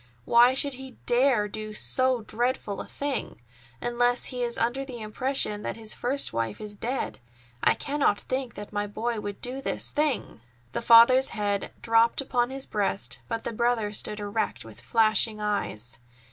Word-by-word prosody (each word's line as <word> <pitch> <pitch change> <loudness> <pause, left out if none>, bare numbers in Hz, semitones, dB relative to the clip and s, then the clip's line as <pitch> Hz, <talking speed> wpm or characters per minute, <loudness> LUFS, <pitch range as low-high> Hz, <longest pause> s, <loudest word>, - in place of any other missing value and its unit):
Why 240 +2 +6
should 280 +1 +3
he 265 0 -10
dare 245 -3 +3
do 215 +1 -6
so 255 0 +1
dreadful 230 -2 -2
a - - -9
thing!—unless 240 - -2
he 250 -1 -3
is 235 -1 0
under 240 +4 0
the 255 -3 -8
impression 215 0 0
that - - -4
his 220 -1 -3
first 265 - -1
wife 115 -2 -2
is 210 -1 -5
dead. 245 - -3 0.4
I - - +4
cannot 280 -8 0
think 260 -2 -3
that 205 +1 -9
my 205 0 -1
boy 225 +2 -3
would 205 -1 -6
do 255 +2 -4
this - - -1
thing!" 290 - -1 0.3
The - - -3
father's 235 +3 +7
head 205 -1 -1
dropped 230 0 +3
upon 250 -3 0
his 270 0 -5
breast, 200 -2 -1
but 230 -1 -3
the - - -3
brother 230 -2 0
stood 210 0 +1
erect 205 - -3
with 115 +1 -12
flashing 220 -1 +3
eyes. 120 - -2
230 Hz, 165 wpm, -27 LUFS, 205-255 Hz, 0.4 s, father's